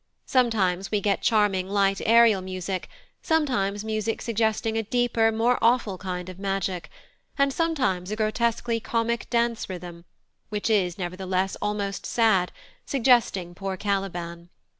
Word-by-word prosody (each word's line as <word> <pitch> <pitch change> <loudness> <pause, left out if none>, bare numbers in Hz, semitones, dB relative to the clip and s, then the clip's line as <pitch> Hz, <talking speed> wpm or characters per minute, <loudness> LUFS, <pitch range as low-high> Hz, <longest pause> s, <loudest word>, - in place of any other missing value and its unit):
Sometimes 200 -7 +1
we 210 - +1
get 200 0 0
charming 200 -4 +2
light 195 -1 +2
Ariel 230 -3 +6
music, 185 0 -4 0.3
sometimes 220 -11 0
music 220 0 -2
suggesting 225 -1 0
a 225 - +1
deeper, 225 0 +1
more 230 +3 +2
awful, 225 -5 +2
kind 180 -2 -4
of 185 0 -9
magic, 195 -2 -2 0.5
and 275 0 +2
sometimes 255 - 0
a 215 - -2
grotesquely 230 +1 0
comic 230 +1 -1
dance 235 -2 0
rhythm, 175 -2 -8 0.4
which 210 +1 -1
is, 185 -5 +1
nevertheless, 185 +1 -2
almost 205 -1 -2
sad, 215 -6 +2 0.3
suggesting 235 -9 +2
poor 190 +1 -4
Caliban. 175 -4 -3
205 Hz, 130 wpm, -25 LUFS, 185-230 Hz, 0.5 s, Ariel